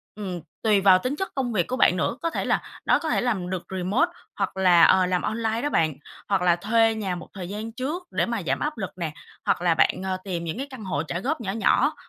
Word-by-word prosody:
Ừm, 185 -5 -5 0.2
tùy 210 -3 +4
vào 190 -1 +6
tính 255 +7 -2
chất 385 +5 -3
công 255 -3 -1
việc 180 -5 +1
của 255 - -2
bạn 180 - +4
nữa, 230 - -1
có 335 - 0
thể - - -3
là - - +1 0.2
nó - - +4
có 320 - -3
thể - - +1
làm 200 -8 -1
được 185 -2 -3
remote 210 - +1 0.2
hoặc 195 -1 -2
là, 180 -3 +6
ờ, 185 +2 +6
làm 180 0 0
online 225 +1 -1
đó 290 - 0
bạn, 155 - +2 0.4
hoặc 195 -2 +2
là 175 -1 +4
thuê 225 +4 +2
nhà 195 -4 -2
một 175 - -8
thời 185 -2 -6
gian 215 +2 -5
trước 290 +10 -4
để - - +1
mà 235 -3 -2
giảm 135 - +1
áp 300 -2 -2
lực 190 -4 -3
nè, 165 -4 -3 0.3
hoặc - - +1
là 175 -2 +3
bạn, 180 - +2
ờ, 190 -1 -1
tìm 175 -4 -3
những 170 +6 -4
cái 275 - -4
căn 260 -6 -9
hộ 155 -5 -1
trả 170 +2 -4
góp 270 - -2
nhỏ 195 -4 -2
nhỏ 220 +2 +2
195 Hz, 265 wpm, -25 LUFS, 180-235 Hz, 0.4 s, vào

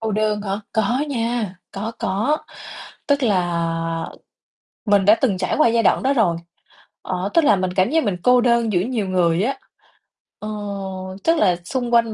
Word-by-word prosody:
Cô 220 -1 -2
đơn 210 0 0
hả? 200 0 -3
Có 240 +6 +1
nha, 230 -6 -2 0.2
có, 215 +4 -4
có, 220 +11 0 0.7
tức 285 -1 +1
là 165 -5 -1 0.8
mình 200 -3 +3
đã 210 +2 +7
từng 225 -9 +2
trải 185 - -1
qua 305 - +5
giai 230 0 +2
đoạn - - +2
đó 270 +2 +2
rồi, 205 -10 +2 0.6
ờ, 185 +1 -3
tức 335 - +4
là 210 - +5
mình 185 -1 -2
cảm 185 +2 +2
giác 320 +1 +2
mình 200 -5 -1
cô 250 0 +5
đơn 235 -2 +2
giữa 175 - +2
nhiều 225 -1 -2
người 180 0 +2
á, 270 +4 -2 0.8
ờ, 210 - -6 0.7
tức 330 +1 +3
là 185 - +3
xung 245 +3 -3
quanh 230 -1 +3
215 Hz, 180 wpm, -21 LUFS, 185-240 Hz, 0.8 s, đã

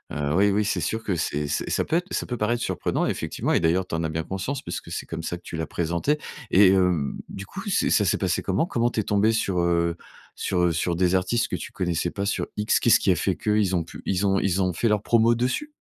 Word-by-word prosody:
heu, 75 0 -1
oui, 100 +2 +4
oui, 105 +1 +1
c'est - - 0
sûr 110 0 -2
que 95 -5 -1
c'est 75 -2 -2
c'est 75 - -2
ça - - +1
peut 165 - +1
être 180 +2 -3
ça - - -1
peut 120 - -4
paraître 120 +3 0
surprenant, - - -1
effectivement - - -2
et - - +4
d'ailleurs, 85 +3 +2
tu - - -9
en 80 - -1
as 80 - -1
bien 80 +1 -2
conscience 110 - -4
puisque - - -6
c'est - - -4
comme - - -5
ça 85 - -3
que - - -20
tu - - -7
l'as 80 - -3
présenté 85 - 0 0.3
et 95 0 +7
hem, 90 -6 +2
du 100 +1 -7
coup, 195 - -8
c'est - - +2
ça 105 - +4
s'est - - +2
passé 90 -2 0
comment? 95 - 0
Comment 120 -6 0
tu 115 - -3
es - - -6
tombée 105 +2 +2
sur, 95 -5 0
heu, 85 -1 +1 0.4
sur, 90 - -1
heu, 85 - +3
sur 85 +1 -1
des 90 +1 +2
artistes 105 +6 +1
que - - -3
tu - - -7
connaissais 85 -1 -1
pas 100 -1 -3
sur 100 - -1
X? 105 +2 +2
Qu'est-ce 120 - +5
qui 95 - +2
a 90 - +3
fait 90 +3 0
que? 105 - -2
Ils 95 -3 +2
ont 85 - +1
pu - - -11
ils 95 +1 0
ont 95 0 +2
ils 95 0 +1
ont 90 -1 0
fait 115 - 0
leur 105 -1 +2
promo 115 0 +4
dessus? 130 - -2
95 Hz, 275 wpm, -25 LUFS, 85-110 Hz, 0.4 s, et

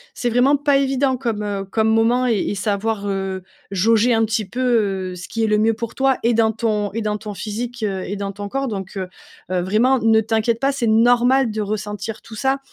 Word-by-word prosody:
c'est 245 - -1
vraiment 255 +4 +4
pas 285 0 +2
évident 270 -1 +1
comme, 230 -5 -2
heu, 200 -1 -3
comme 220 +3 0
moment 230 +3 +3
et 230 -5 +2
et 205 - -2
savoir, 205 +1 -2
heu, 190 -1 -3 0.3
jauger 225 +5 +3
un 225 - +2
petit 215 0 -1
peu, 210 -7 0
heu, 180 - -7
ce 175 - -8
qui 225 -1 -2
est - - +2
le 210 0 +2
mieux 225 +1 +3
pour 230 +1 -5
toi 270 -1 +2
et 235 +1 +3
dans 225 -1 +2
ton 215 -3 -1
et 230 - -2
dans 210 -1 -1
ton 210 -1 -7
physique, 230 +4 -5
heu 195 -3 -2
et 200 - -4
dans 200 0 -4
ton 205 +1 -7
corps. 270 +4 -2
Donc, 195 -3 -5
heu 190 -1 -3 0.4
heu, 180 -1 +1
vraiment 225 +8 +2
ne 225 -1 +4
t'inquiète 225 +1 0
pas, 275 +1 +2
c'est 260 -4 -2
normal 245 +3 +4
de 215 0 -3
ressentir 210 +1 -4
tout 225 - -11
ça, 265 +4 0
220 Hz, 230 wpm, -20 LUFS, 205-245 Hz, 0.4 s, vraiment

